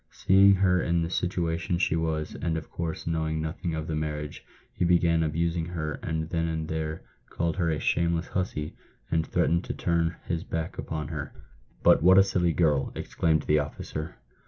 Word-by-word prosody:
Seeing 100 +1 +5
her 90 -1 +3
in 85 0 +1
the 80 - -3
situation 85 -1 -1
she 85 - +1
was, 80 -1 -1
and 80 -1 -2
of 80 - -7
course 85 -2 -4
knowing 80 -1 -1
nothing 80 +1 -3
of 80 -1 -3
the 80 - -4
marriage, 75 -1 -4 0.3
he - - -2
began 85 -1 +3
abusing 80 +1 0
her, 80 -3 -4
and 80 0 -2
then 85 -1 0
and 80 -1 -2
there 80 0 -3 0.3
called 85 +1 -2
her 85 -3 +1
a 80 -2 0
shameless 85 +1 0
hussy, 85 -5 -3 0.4
and 80 -1 +1
threatened 85 +2 +1
to - - -4
turn 85 -1 0
his 85 -1 -2
back 80 0 -4
upon 75 -2 -4
her." 75 -2 -5 0.3
" - - -32
But - - +6
what 95 +3 +7
a 95 - +9
silly 90 -3 +1
girl!" 75 -5 +2
exclaimed 80 -2 0
the 75 0 +3
officer. 75 +2 -5
80 Hz, 185 wpm, -27 LUFS, 80-85 Hz, 0.4 s, a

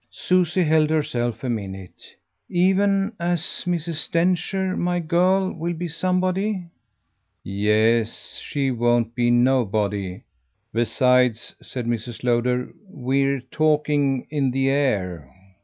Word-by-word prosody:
Susie 180 0 +1
held 155 -1 +3
herself 120 -7 -1
a - - -2
minute. 95 -5 -6 0.3
"Even 195 +3 +2
as 170 -1 0 0.3
Mrs. 170 -2 -2
Densher 185 +2 0
my 175 0 0
girl 180 +3 +2
will 170 +1 -3
be 175 +2 -4
somebody." 185 +3 -1 0.8
"Yes, 110 +3 0
she 140 -2 -1
won't 120 -1 +1
be 120 0 +1
nobody. 105 -6 +1 0.5
Besides," 125 0 +2
said 125 -2 -6
Mrs. 120 0 -4
Lowder, 125 +1 0 0.2
"we're 135 -2 0
talking 145 -1 +1
in 140 -3 +1
the 135 +1 +1
air." 95 - -1
135 Hz, 105 wpm, -23 LUFS, 120-175 Hz, 0.8 s, held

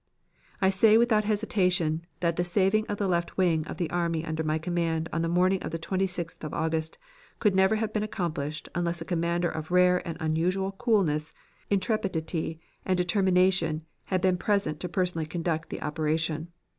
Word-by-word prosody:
"I 190 - +6
say 215 +3 +5
without 225 -2 +3
hesitation 180 -6 +1
that 170 -1 +1
the 175 - +1
saving 195 +4 +2
of 205 - -3
the 200 - 0
left 175 -2 -1
wing 165 -4 +2
of - - -6
the 175 - -1
army 170 -2 0
under 160 0 -2
my 155 0 0
command 165 -1 -1
on 165 - 0
the 165 - 0
morning 185 +2 +2
of - - -4
the 165 - -3
26th 180 -1 -2
of 155 - -4
August, 160 0 -1 0.4
could 210 -3 +2
never 190 +3 +4
have 215 0 -2
been 215 - 0
accomplished 155 -7 -3
unless 170 -1 -1
a - - -4
commander 170 0 0
of 160 -1 -6
rare 180 0 +4
and 165 - -4
unusual 180 +5 0
coolness, 190 -8 0 0.3
intrepidity, 185 -6 -1 0.2
and 185 -1 +1
determination 180 -3 +2 0.2
had 185 -2 0
been 185 -1 +3
present 190 -6 0
to 180 - -3
personally 175 -3 0
conduct 160 -1 -2
the - - -5
operation. 155 +1 -1
175 Hz, 175 wpm, -28 LUFS, 160-190 Hz, 0.4 s, I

